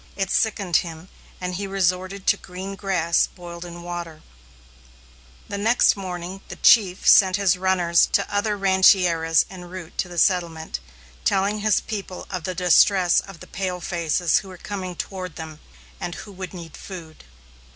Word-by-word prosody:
It 195 -2 -2
sickened 200 -6 +2
him, 165 +1 -6 0.3
and 180 0 -4
he 195 +2 -3
resorted 185 0 -1
to - - +4
green 190 +2 -8
grass 185 -4 +1
boiled 175 -1 -10
in 175 0 -9
water. 170 -2 -7 1.2
The 200 - -4
following 230 +4 +1
morning 185 -1 -6
the - - -8
chief 190 -5 +4
sent 190 -2 +7
his 200 -2 +3
runners 180 -2 +3
to - - +1
other 205 0 0
rancherias, 185 -4 +4
en 185 -2 -10
route 175 -1 -9
to 180 - 0
the 175 - -9
settlement, 170 - +1 0.4
telling 200 +2 +1
his 210 -1 +2
people 195 -4 -6
of 180 -4 -4
the 185 - -3
distress 180 0 +4
of 195 -4 -10
the - - -9
pale 185 -1 -4
faces 170 -1 +1
who - - -12
were 185 -1 -10
coming 185 -2 -6
toward 185 -2 -6
them, 160 -2 -8 0.4
and 175 - -4
who 205 - -9
would 185 -2 -7
need 170 -3 -9
food. 170 -5 -10
185 Hz, 160 wpm, -23 LUFS, 175-195 Hz, 1.2 s, sent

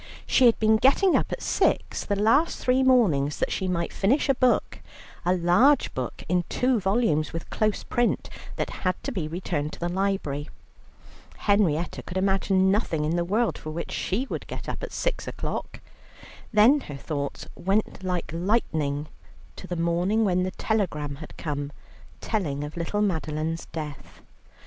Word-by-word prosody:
She 255 - +5
had 230 - +4
been 220 0 +4
getting 280 - +4
up - - +1
at - - -4
six - - +1
the 205 - -1
last 230 +11 +3
three 255 +1 +2
mornings 190 - +3
that - - -1
she 190 - -1
might 170 -2 -1
finish 260 +9 +2
a - - +6
book, 255 -1 +1 0.4
a 180 +1 +2
large 185 +12 +4
book 130 -2 -5
in 180 +1 +2
two 250 -2 +2
volumes 190 -6 +1
with 165 - -6
close 215 -1 0
print, 240 -1 0 0.3
that - - -2
had 185 -1 +1
to 275 - -3
be 180 - -3
returned 155 -3 -3
to - - -9
the 175 - -1
library. 190 -7 -1 0.9
Henrietta 180 -6 +1
could 185 - -6
imagine 190 0 +2
nothing 170 -7 0
in 160 +3 0
the 175 - +1
world 215 +6 0
for 155 - -7
which 165 +2 -5
she 225 +8 -1
would - - -5
get - - -7
up - - -4
at - - -5
six - - -2
o'clock. - - -5 0.7
Then 230 +7 +6
her 145 - -8
thoughts 140 0 -4
went 195 +2 -1
like 180 -3 -2
lightning 160 -6 0 0.5
to 185 - -10
the 180 - -3
morning 175 +6 +1
when 185 -2 +2
the 185 - 0
telegram 160 -9 -2
had 155 +1 -11
come 145 -2 -3 0.5
telling 150 -10 -2
of 150 +1 -7
little 175 +5 -1
Madeline's 160 -3 -2
death. 150 -3 -8
185 Hz, 170 wpm, -26 LUFS, 155-220 Hz, 0.9 s, a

